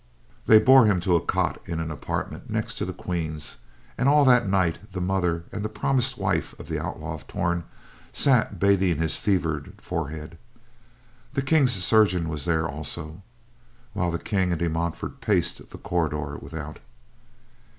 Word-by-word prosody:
They 110 - +9
bore 130 +1 +7
him 100 -4 +3
to 90 0 +2
a 85 - +2
cot - - 0
in 85 -1 -3
an 80 0 -3
apartment 75 - -5
next - - -3
the - - -2
Queen's, 80 -4 -4 0.4
and 130 - +4
all 145 0 +5
that 125 -5 +5
night 90 -4 +1
the 95 - -3
mother 90 -2 0
and 105 - -4
the 110 - -2
promised 125 +3 0
wife 95 -6 -1
of - - -9
the - - -2
Outlaw - - -5
of - - -10
Torn 85 -1 -1 0.5
sat 125 -7 +2
bathing 95 -3 +3
his 80 0 0
fevered 80 -7 -1
forehead. 80 +2 -5 1.0
The 135 - +1
King's 135 -3 +3
chirurgeon 95 -3 +3
was 75 -2 -4
there 80 -1 +1
also, 80 +3 -6 0.7
while 90 -1 0
the 85 - -1
King 95 0 0
and 85 - 0
De 85 +1 0
Montfort 85 - -3
paced 100 -6 0
the - - -10
corridor 75 -4 -2
without. 75 -1 -7
90 Hz, 160 wpm, -25 LUFS, 80-105 Hz, 1.0 s, They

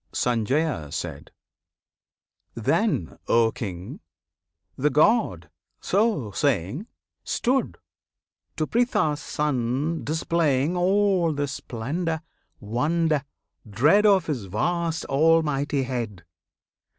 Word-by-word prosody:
Sanjaya. 105 - -1 1.3
Then, - - 0
O 115 -1 +4
King! 95 -5 -6 0.8
the 145 +3 +1
God, 150 - +2 0.3
so 195 - +1
saying, 135 - -1 0.4
Stood, 260 +2 0 0.8
to 155 - 0
Pritha's 160 -10 +1
Son 145 +3 -1
displaying 155 -1 +1
All 185 -2 +2
the 145 0 -1
splendour, 150 +6 -3 0.4
wonder, 150 +7 0 0.5
dread 150 - +4
Of 195 -2 +4
His 130 -10 -3
vast 165 - -1
Almighty 145 -2 +2
head. 115 -8 -4
150 Hz, 80 wpm, -25 LUFS, 115-170 Hz, 1.3 s, O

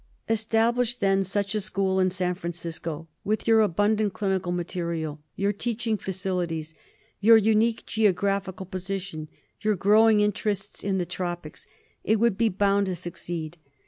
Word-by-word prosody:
Establish, 225 +2 +1
then, 195 -4 +2
such 200 +1 -1
a 215 - 0
school 190 -2 0
in 185 0 +3
San 180 -1 -1
Francisco; 165 -2 -5 0.2
with 215 +3 -1
your 225 -1 +6
abundant 205 +1 +2
clinical 190 -3 -1
material, 170 -3 -3
your 200 +1 0
teaching 225 +1 -1
facilities, 180 -5 -3 0.5
your 225 +2 +7
unique 220 +1 +2
geographical 200 -2 0
position, 185 -3 -5 0.3
your 215 -1 +2
grow 210 +4 +5
ing 215 -1 +4
interests 205 -1 -1
in 195 -1 0
the 180 - 0
tropics, 175 -2 -5 0.4
it 220 0 +2
would 230 -3 +3
be 225 +2 +2
bound 200 +1 +2
to 185 - -1
succeed. 170 -1 -6
195 Hz, 145 wpm, -26 LUFS, 175-215 Hz, 0.5 s, your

